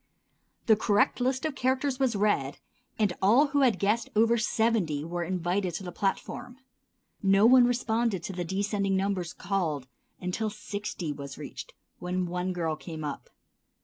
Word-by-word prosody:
The 220 Hz, -, +6 dB
correct 210 Hz, +2 st, +2 dB
list 260 Hz, +3 st, 0 dB
of 310 Hz, -, -1 dB
characters 260 Hz, +1 st, 0 dB
was 260 Hz, -4 st, +2 dB
read, 195 Hz, -10 st, +1 dB, 0.4 s
and 210 Hz, -5 st, +2 dB
all 245 Hz, +10 st, +5 dB
who 285 Hz, 0 st, +2 dB
had 255 Hz, -5 st, +4 dB
guessed 215 Hz, +3 st, +1 dB
over 225 Hz, +2 st, +4 dB
seventy 215 Hz, -9 st, +1 dB
were 175 Hz, +1 st, -3 dB
invited 180 Hz, +1 st, -1 dB
to 190 Hz, -, -5 dB
the 180 Hz, -, -6 dB
platform. 205 Hz, +6 st, -3 dB, 0.6 s
No 195 Hz, +1 st, +4 dB
one 250 Hz, +1 st, +7 dB
responded 230 Hz, -5 st, 0 dB
to 195 Hz, -, -5 dB
the 180 Hz, -1 st, -3 dB
descending 195 Hz, +2 st, 0 dB
numbers 190 Hz, -3 st, -1 dB
called 175 Hz, -8 st, -2 dB, 0.3 s
until 185 Hz, +5 st, -2 dB
sixty 205 Hz, -6 st, -5 dB
was 140 Hz, -2 st, -8 dB
reached, -, -, -8 dB, 0.2 s
when 180 Hz, +1 st, -2 dB
one 180 Hz, +1 st, -2 dB
girl 165 Hz, -3 st, -1 dB
came 160 Hz, 0 st, -8 dB
up. 145 Hz, -2 st, -5 dB
200 Hz, 155 wpm, -28 LUFS, 175-230 Hz, 0.6 s, one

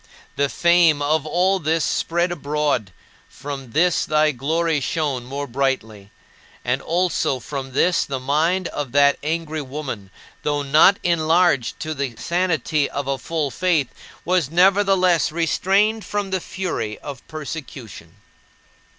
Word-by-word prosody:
The 140 Hz, 0 st, +1 dB
fame 170 Hz, -3 st, +4 dB
of 150 Hz, +1 st, 0 dB
all 185 Hz, +4 st, +2 dB
this 160 Hz, -1 st, 0 dB
spread 175 Hz, +1 st, 0 dB
abroad; 145 Hz, -, -1 dB, 0.4 s
from 135 Hz, -3 st, -7 dB
this 175 Hz, +1 st, +3 dB
thy 155 Hz, 0 st, +2 dB
glory 155 Hz, +4 st, 0 dB
shone 140 Hz, -3 st, -2 dB
more 140 Hz, +3 st, -4 dB
brightly. 120 Hz, -6 st, -2 dB, 0.6 s
And 125 Hz, +2 st, 0 dB
also 170 Hz, -6 st, 0 dB
from 135 Hz, 0 st, -6 dB
this 175 Hz, +6 st, +2 dB
the 135 Hz, -1 st, -4 dB
mind 160 Hz, +7 st, +1 dB
of 140 Hz, -4 st, -5 dB
that 140 Hz, 0 st, +4 dB
angry 155 Hz, 0 st, -2 dB
woman, 130 Hz, -8 st, -6 dB, 0.3 s
though 145 Hz, -1 st, -1 dB
not 155 Hz, +8 st, +5 dB
enlarged 165 Hz, -5 st, +2 dB
to 155 Hz, -2 st, -3 dB
the 140 Hz, -5 st, -4 dB
sanity 165 Hz, -4 st, 0 dB
of 140 Hz, -, -4 dB
a 135 Hz, -1 st, -1 dB
full 155 Hz, -4 st, -2 dB
faith, 170 Hz, -8 st, +1 dB, 0.4 s
was 175 Hz, -5 st, +1 dB
nevertheless 185 Hz, -1 st, +3 dB
restrained 195 Hz, +6 st, +1 dB
from 205 Hz, 0 st, -3 dB
the 190 Hz, -1 st, -1 dB
fury 175 Hz, -, -4 dB
of 140 Hz, -4 st, -8 dB
persecution. 135 Hz, -, -8 dB
155 Hz, 135 wpm, -21 LUFS, 140-175 Hz, 0.6 s, not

